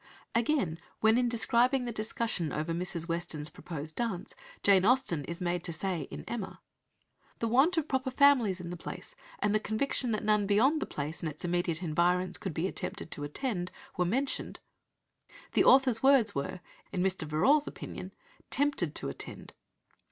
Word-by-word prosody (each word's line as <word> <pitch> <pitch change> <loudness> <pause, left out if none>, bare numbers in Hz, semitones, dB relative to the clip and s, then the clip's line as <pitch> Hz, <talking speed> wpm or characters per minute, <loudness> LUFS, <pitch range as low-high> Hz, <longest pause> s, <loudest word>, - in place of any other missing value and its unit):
Again, 230 - +1 0.2
when 220 +1 +5
in 245 0 +2
describing 245 +2 +3
the 240 - -3
discussion 215 -6 -2
over 155 +2 -2
Mrs. 170 -1 -2
Weston's 165 -3 -3
proposed 155 -2 -7
dance, 225 -7 -3 0.3
Jane 195 -2 +5
Austen 240 - +2
is 170 0 -4
made 175 -1 -1
to 175 - -3
say 170 -3 -2
(in - - -7
Emma), 225 -5 -5 0.8
"The 230 - -1
want 275 +10 +4
of 315 -2 +1
proper 265 -1 0
families 255 -8 +4
in 175 -1 -6
the - - -4
place, - - -7 0.2
and 210 - +1
the 215 - +3
conviction 240 +4 0
that 215 - -2
none 210 -1 +3
beyond 260 +10 +3
the - - -2
place 150 +2 -4
and 160 - -2
its 150 - -6
immediate 175 -1 0
environs 180 +3 +1
could 190 -6 -5
be 165 - 0
attempted 185 -1 -4
to 145 - -3
attend, 180 - -3 0.2
were 180 - +2
mentioned," 260 +10 -1 0.9
the - - +4
author's 260 -4 +5
words 265 -6 +5
were, 155 +6 -4 0.3
in 185 -2 -1
Mr. 185 -4 -1
Verrall's 275 - +3
opinion, - - -7 0.4
"tempted 275 - +1
to - - -2
attend." 70 - -8
195 Hz, 170 wpm, -30 LUFS, 170-245 Hz, 0.9 s, when